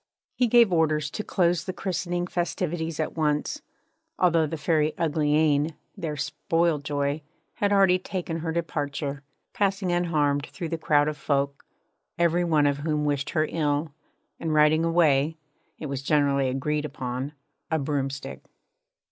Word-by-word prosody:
He 250 - +2
gave 235 -4 +5
orders 155 -3 +1
to 215 - -4
close 175 -4 +1
the 185 - -3
christening 175 -1 -2
festivities 170 -2 -2
at 155 - -2
once, 155 - 0 0.6
although 165 -3 +3
the 160 - -4
Fairy 155 -1 +1
Uglyane, 150 -1 +2 0.2
their 150 -3 -4
spoil 165 +2 0
joy, 145 +1 -2 0.4
had 205 0 +1
already 195 -2 +5
taken 180 -3 -4
her 165 0 -3
departure; 145 -4 -3 0.3
passing 195 -2 0
unharmed 150 -5 +1
through 170 -3 -6
the 165 0 -3
crowd 145 -2 +3
of 155 -1 -2
folk, 140 -1 -1 0.5
every 170 +1 +2
one 155 -4 +3
of 140 -1 +2
whom 150 0 -1
wished 145 -1 0
her 155 -2 +1
ill, 150 -1 0 0.5
and 160 -2 -1
riding 155 +1 +5
away 160 -2 +3 0.4
it - - -7
was 135 -2 -3
generally 140 -2 +2
agreed 150 +3 -1
upon 130 -1 -4 0.4
a 160 - +1
broomstick. 140 -1 -3
155 Hz, 145 wpm, -26 LUFS, 145-170 Hz, 0.6 s, gave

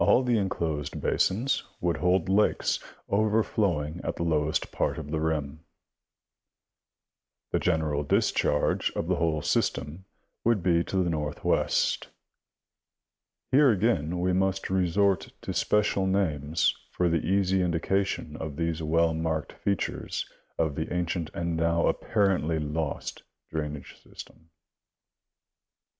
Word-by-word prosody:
All 125 - +5
the 120 -3 +2
enclosed 80 -7 -2
basins 120 +8 +1 0.2
woUld 85 -2 0
hold 90 -1 +2
lakes, 100 +3 +2 0.3
overflowing 100 -7 +1
at - - -2
the - - -3
lowest 80 -1 0
part - - -1
of 75 -2 -6
the 80 - 0
rim. 80 -2 -2 1.9
The - - +2
general 80 -4 +1
discharge 75 0 +1
of - - -2
the - - +1
whole 80 -2 0
system 80 +6 -1 0.4
would 115 -6 +2
be 85 -1 +3
to 95 -1 0
the 85 - 0
northwest. 75 -2 0 1.4
Here 140 +1 +6
again 90 -6 +1
we 90 +1 +1
must 95 +1 0
resort 95 +1 +2
to - - -3
special 100 -2 +2
names 80 -5 +1
for 90 - 0
the 85 -1 +1
easy 95 -1 +2
indication 90 -1 -1
of 80 -3 -5
these 80 0 -1
well 80 +1 +2
marked 80 -1 -2
features 100 -1 -2 0.3
of 80 -3 +1
the 80 +3 -4
ancient 85 -2 -1
and 85 -1 -1
now 85 +1 +2
apparently 95 -7 +1
lost 75 0 -3 0.3
drainage 75 -2 -4
system. 80 0 -13
85 Hz, 120 wpm, -27 LUFS, 80-95 Hz, 1.9 s, Here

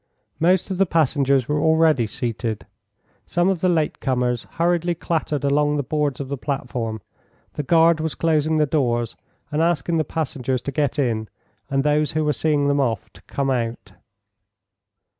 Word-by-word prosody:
Most 180 +3 +2
of 185 - -3
the 195 - +4
passengers 140 -5 +2
were 150 0 0
already 160 -6 +3
seated. 115 -1 -3 0.6
Some 175 +2 +2
of 185 -4 -1
the 185 - +3
late 160 -3 0
comers 125 -3 0
hurriedly 175 +1 +1
clattered 155 -3 -2
along 145 +1 +2
the 145 - 0
boards 145 -1 -1
of 140 - -4
the 140 -1 -4
platform, 120 -6 -3 0.5
the - - -3
guard 165 +3 +4
was 160 -1 -2
closing 155 -1 +1
the 155 - +4
doors 120 -6 0 0.4
and 150 +2 0
asking 165 0 +1
the 160 - +2
passengers 135 -5 -2
to 140 - -3
get 145 0 -1
in 115 -6 0 0.4
and 135 -1 +1
those 150 0 +1
who 155 0 0
were 150 - +2
seeing 150 -2 +1
them 140 0 +2
off 115 -7 -1
to - - -17
come 135 -1 -1
out. 120 -2 -3
145 Hz, 170 wpm, -22 LUFS, 130-160 Hz, 0.6 s, the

